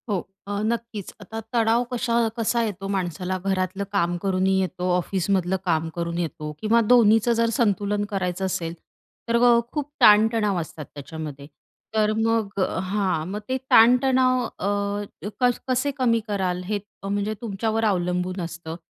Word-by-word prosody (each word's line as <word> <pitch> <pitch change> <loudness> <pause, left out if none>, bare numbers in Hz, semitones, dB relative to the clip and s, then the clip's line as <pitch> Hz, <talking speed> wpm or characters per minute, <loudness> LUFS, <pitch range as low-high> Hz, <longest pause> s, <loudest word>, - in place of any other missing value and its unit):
हो. 200 -3 +1 0.3
अ, 205 0 -2
नक्कीच, 230 -3 -3
आता 220 +3 -7
तणाव 230 0 +3
कशा 240 -1 0 0.2
कसा 235 +1 +1
येतो 195 -3 -4
माणसाला? 180 0 -2
घरातलं 190 0 -1
काम 175 -3 +1
करूनही 190 0 +1
येतो, 185 -1 -2
ऑफिसमधलं 185 0 0
काम 160 -2 +1
करून 170 0 -3
येतो 155 -3 -4
किंवा 225 +2 +3
दोन्हीचं 230 -1 +5
जर 230 0 +3
संतुलन 205 -3 +1
करायचं 190 -2 -2
असेल, 170 -3 -2 0.5
तर 230 - +1
अ, 240 -1 +6
खूप 295 -2 -3
ताणतणाव 210 -2 +5
असतात 155 -1 -8
त्याच्यामध्ये 145 -1 -7 0.5
तर 215 -1 +3
मग 225 -3 0
हां. 185 -3 0
मग 200 +3 -4
ते 260 - +1
ताणतणाव 255 +2 +5
अ, 205 0 -3
क 250 - +5 0.2
कसे 255 +2 +1
कमी 235 -3 +2
कराल 185 -3 -1
हे 205 +2 -1 0.2
अ, - - -4
म्हणजे 205 +1 -1
तुमच्यावर 225 0 -1
अवलंबून 180 -1 0
असतं. 170 -1 -6
200 Hz, 145 wpm, -24 LUFS, 180-225 Hz, 0.5 s, अ